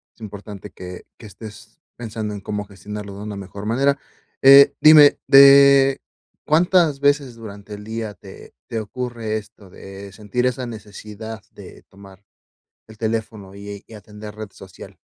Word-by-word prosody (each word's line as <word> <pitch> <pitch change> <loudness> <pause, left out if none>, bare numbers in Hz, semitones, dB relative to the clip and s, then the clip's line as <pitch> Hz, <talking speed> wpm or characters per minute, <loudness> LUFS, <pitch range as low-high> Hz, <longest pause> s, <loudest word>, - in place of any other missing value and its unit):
es - - -27
importante 105 -1 -10
que 90 -1 -11
que - - -14
estés 105 +1 -13 0.2
pensando 110 -2 -6
en 100 - -8
cómo 105 +1 -5
gestionarlo 100 +1 -9
de 105 - -8
una 105 -1 -7
mejor 100 +1 -9
manera, 140 +5 +1 0.5
eh, 140 +1 +8
dime, 155 -2 +7
de, 140 0 +6 0.5
¿cuántas 165 -2 +2
veces 145 -2 +1
durante 105 -2 -11
el 105 - -9
día 110 -1 -6
te 95 -1 -15
te 115 - -4
ocurre 115 -1 -5
esto, 105 -2 -13
de 95 +2 -12
sentir 110 +5 -3
esa 125 0 -2
necesidad 110 0 -10
de - - -14
tomar 95 0 -17 0.6
el 110 -1 -16
teléfono 110 -3 -5
y 100 0 -10
y - - -15
atender 105 0 -11
red 110 -2 -9
social? 95 -2 -14
110 Hz, 150 wpm, -20 LUFS, 100-125 Hz, 0.6 s, eh